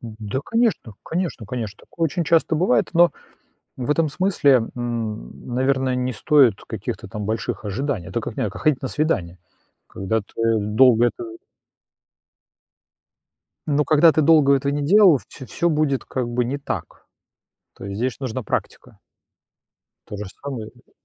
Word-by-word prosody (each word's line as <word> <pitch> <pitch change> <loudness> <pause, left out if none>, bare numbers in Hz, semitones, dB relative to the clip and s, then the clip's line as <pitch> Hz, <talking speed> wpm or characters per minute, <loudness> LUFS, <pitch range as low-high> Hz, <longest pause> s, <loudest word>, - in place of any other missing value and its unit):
Да, 110 +1 -5
конечно, 225 - 0
конечно, 165 - -3
конечно, 110 -3 -5
такое 165 - -4
очень 165 +2 -1
часто 165 0 +2
бывает, 155 -6 +2
но 170 0 +5 0.6
в 130 +2 -3
этом 155 +1 +2
смысле, 145 - +3
м, 115 - -5
наверное, 130 0 +1
не 125 0 -1
стоит 130 -3 +4
каких-то - - -6
там 105 -1 -5
больших 110 0 -3
ожиданий, 105 -1 -3
это 115 +5 -2
как 110 - -7
не - - -1
как - - -9
ходить 150 -4 +2
на 130 - -2
свидания, 100 - -1 0.5
когда 105 +4 -2
ты 115 +2 -1
долго 115 +3 +4
это 355 - -4 2.4
но 150 0 +2
когда 155 +2 +5
ты 155 - +1
долго 150 -2 +5
этого 140 +1 -1
не 145 0 -2
делал, 185 -3 +6
всё 130 - -11
всё 170 +6 -1
будет 150 -4 0
как 130 -2 -3
бы 120 +1 -1
не 135 +4 -2
так. 140 - -6 0.7
То - - -10
есть 100 0 -5
здесь 125 +2 -2
нужна 130 -2 -4
практика. - - -5 1.1
То 105 - -7
же 105 - -5 0.2
самое, 130 -6 -5
э 120 +1 -25
130 Hz, 155 wpm, -22 LUFS, 110-150 Hz, 2.4 s, делал